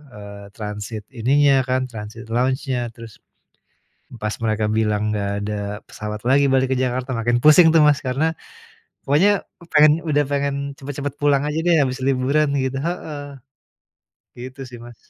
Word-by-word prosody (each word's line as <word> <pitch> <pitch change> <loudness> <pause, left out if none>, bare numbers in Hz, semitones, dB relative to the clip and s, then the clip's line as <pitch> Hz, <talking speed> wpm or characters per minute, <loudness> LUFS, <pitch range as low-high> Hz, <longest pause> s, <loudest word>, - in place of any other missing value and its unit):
eee, 100 -1 -10
transit 105 0 -6
ininya 135 +3 +3
kan, 130 0 +1
transit 110 +1 -8
lounge-nya, 130 0 0
terus, 115 -2 -12 1.0
pas 105 0 -2
mereka 110 -1 0
bilang 105 -1 0
nggak 100 -1 -2
ada 105 0 -3 0.3
pesawat 105 0 -6
lagi 140 +2 +4
balik 130 0 +2
ke - - -1
Jakarta, 130 +1 -2
makin 120 +1 +1
pusing 160 +2 +7
tuh 165 - +6
Mas. 145 -1 +3
Karena, 155 +6 0 0.7
pokoknya 190 +9 +3 0.3
pengen, 150 0 +7
udah 145 -2 +1
pengen 140 0 0 0.2
cepet-cepet 145 0 -5
pulang 145 -1 +3
aja 150 +1 -2
deh 170 -2 +4
habis 130 +1 -4
liburan 135 +3 +2
gitu 130 0 -2
heeh. 155 -4 -5 1.1
Gitu 130 +2 -9
sih 120 - -10
Mas. 120 0 -12
130 Hz, 145 wpm, -21 LUFS, 110-145 Hz, 1.1 s, pusing